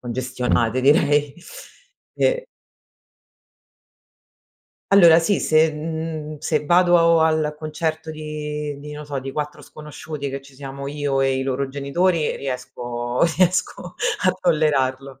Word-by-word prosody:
congestionate 125 -1 -1
direi. 145 0 +3 0.8
E - - +1 2.5
Allora 170 -5 +8
sì, 180 +4 +1
se 155 0 +3
mhmm, 155 0 -5
se 150 0 -1
vado 175 -1 +5
al 155 -1 +1
concerto 160 0 -3
di 150 -1 -5
di 150 +1 -9
non 150 0 -8
so, 140 -2 -4
di 135 0 -6
4 150 +1 -5
sconosciuti 150 -1 -7
che 135 0 -6
ci 135 0 -17
siamo 140 0 -8
io 145 -1 -1
e 135 0 +1
i - - -1
loro 135 +1 -2
genitori 150 +5 0
riesco 125 -2 -4 0.2
riesco 180 0 0 0.3
a 185 - +4
tollerarlo. 140 -5 0
150 Hz, 120 wpm, -22 LUFS, 135-160 Hz, 2.5 s, Allora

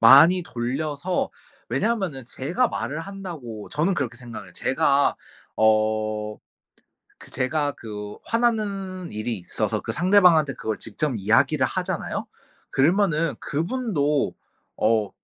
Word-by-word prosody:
많이 165 +10 +8
돌려서 145 +7 -2 0.4
왜냐면은 190 - -1
제가 170 - 0
말을 150 -4 -3
한다고 165 - -7
저는 165 +6 +1
그렇게 125 -7 -2
생각을 115 -5 -9
해요. - - -16
제가 140 +1 +2 0.4
어 110 -1 +1 0.8
그 - - -14
제가 145 +3 0
그 105 -2 -7
화나는 200 -6 -1
일이 110 +1 -3
있어서 90 - -2
그 - - -4
상대방한테 175 -6 +5
그걸 110 -1 -3
직접 150 -3 -2
이야기를 130 +8 +3
하잖아요? 185 -2 -3 0.4
그러면은 165 +1 +2
그분도 155 - 0 0.4
어 110 -2 +2
145 Hz, 265 characters per minute, -24 LUFS, 115-185 Hz, 0.8 s, 많이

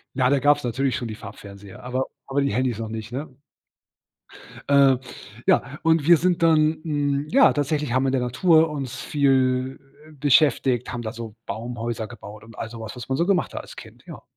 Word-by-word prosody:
Ja, 130 -1 +2
da 140 - +3
gabs 145 +1 +3
natürlich 130 +2 -1
schon 125 -4 -4
die 110 - -6
Farbfernseher, 100 -3 -12
aber 130 +1 -2 0.2
aber 140 +1 0
die 140 -7 0
Handys 125 -2 0
noch 110 - -4
nicht, 110 0 -7
ne? 135 +1 -6 1.3
Äh, 140 -2 +5 0.5
ja, 135 +4 +1
und 160 -2 +2
wir 170 -2 +8
sind 175 +1 0
dann 155 -1 +4
hm, 145 -2 -1
ja, 270 +2 +6
tatsächlich 145 -2 -1
haben 130 +1 +2
wir - - +1
in - - +1
der 130 - +1
Natur 160 +6 +3
uns 135 -4 -5
viel, 130 -2 +1 0.3
äh, - - -15
beschäftigt, 140 -3 +2
haben 120 -1 -4
da 110 - -4
so 115 -1 -8
Baumhäuser 115 +1 -4
gebaut 105 -2 -11
und 115 -1 -15
all 115 - -5
sowas, 110 -1 -8
was 125 +1 -9
man 130 - 0
so 170 - +1
gemacht 185 -1 0
hat - - -4
als - - -13
Kind, - - -13
ja. - - -10
130 Hz, 200 wpm, -23 LUFS, 115-145 Hz, 1.3 s, wir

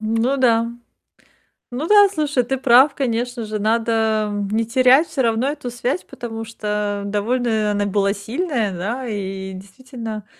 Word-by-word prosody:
Ну 225 +5 0
да. 230 -3 +3 1.0
Ну 285 +7 -3
да, 410 -1 +7
слушай, 290 -7 0
ты 265 +2 -2
прав. 265 +3 +5
Конечно 245 -3 -2
же, 215 0 -4
надо 220 -1 +1 0.2
не 225 +1 +1
терять 255 +6 +4
всё 295 -5 -2
равно 230 +2 +1
эту 290 -3 -4
связь, 245 +7 -2
потому 225 -2 -7
что 210 -2 -3
довольно 215 +1 0
она 205 0 0
была 200 0 +1
сильная, 225 - -2
да? 225 +9 -3
И 190 -2 -5
действительно, 220 +2 -8
230 Hz, 145 wpm, -20 LUFS, 210-255 Hz, 1.0 s, да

